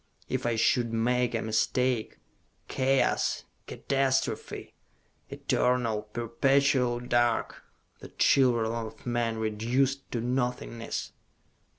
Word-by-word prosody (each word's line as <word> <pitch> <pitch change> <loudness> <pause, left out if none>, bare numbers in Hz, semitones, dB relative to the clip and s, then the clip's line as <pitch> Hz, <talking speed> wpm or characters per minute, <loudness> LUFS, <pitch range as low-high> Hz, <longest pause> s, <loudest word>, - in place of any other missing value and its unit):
If - - -2
I 120 - +1
should 115 +1 +2
make 120 +2 +1
a 115 - -1
mistake.... 115 +2 0 0.5
Chaos! 135 0 +1 0.2
Catastrophe! 135 -1 -1 0.6
Eternal, 120 -4 0
perpetual 125 +2 +2
dark, 120 -1 0 0.4
the - - -11
children 120 -4 +3
of 110 -1 -6
men 120 -2 -1
reduced 120 +5 -1
to 120 - -1
nothingness!" 125 -1 -3
120 Hz, 90 wpm, -28 LUFS, 115-130 Hz, 0.6 s, children